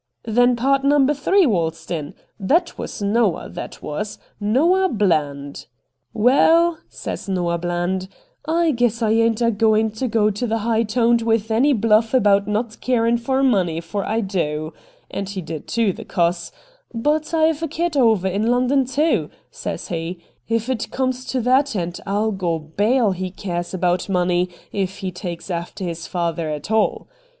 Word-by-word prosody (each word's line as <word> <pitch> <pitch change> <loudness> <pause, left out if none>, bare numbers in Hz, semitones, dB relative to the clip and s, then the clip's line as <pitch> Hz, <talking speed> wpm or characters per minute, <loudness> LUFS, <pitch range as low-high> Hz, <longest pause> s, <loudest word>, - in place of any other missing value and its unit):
' - - -53
Then 245 +2 +3
pard 270 +3 +1
number 285 0 +4
three 360 +7 +3
waltzed 165 - -1
in. 155 -4 -4 0.2
That 330 - +1
was - - -6
Noah, 205 -2 +1
that - - -8
was 200 +8 -4
— - - -39
Noah 330 - +3
Bland.' 145 - -1
' 130 - -53
" - - -49
Waal," 330 +6 +5
says - - -6
Noah 175 -2 0
Bland, 175 +2 -2 0.2
" - - -33 0.2
I 330 - +3
guess 235 -3 0
I 215 - +2
ain't 230 +1 +2
a 230 - +3
goin' 220 0 +2
to 220 +5 -3
go 215 -2 +2
the 225 +2 -1
high 225 +1 +1
toned 230 +1 +2
with 225 -1 0
any 250 +7 +3
bluff 225 +1 +3
about 200 -4 +4
not 215 +2 -2
carin' 235 -2 +2
for 265 +3 0
money, 185 -10 +2
for 195 +4 -4
I 225 +4 -1
do 155 -6 -2
" - - -29
— - - -28
and 195 -1 -4
he 200 -1 -4
did 160 -3 -7
too, 225 -5 +1
the - - -9
cuss 170 0 -1
— - - -31
" - - -30
but 310 +2 +1
I've 320 -1 +2
a 325 - -1
kid 330 +1 -2
over 220 -8 +3
in 200 +4 0
London 255 +3 +2
too," 300 +5 +1 0.2
says - - -6
he, 170 +1 -3 0.2
" - - -44
if 230 0 0
it 255 -4 -2
comes 255 -1 -2
to 255 -1 -1
that, 260 +2 +2
and 175 -2 -3
I'll 210 +3 0
go 180 -4 -1
bail 205 +9 +1
he 185 0 -3
cares 175 -2 -4
about 180 0 0
money, 180 -1 +1 0.2
if 195 -1 -2
he 190 -2 -4
takes 180 0 -6
after 170 +2 -4
his 170 -2 -4
father 170 -2 -2
at 150 +6 -5
all." 220 -1 +1
215 Hz, 190 wpm, -21 LUFS, 180-250 Hz, 0.2 s, Waal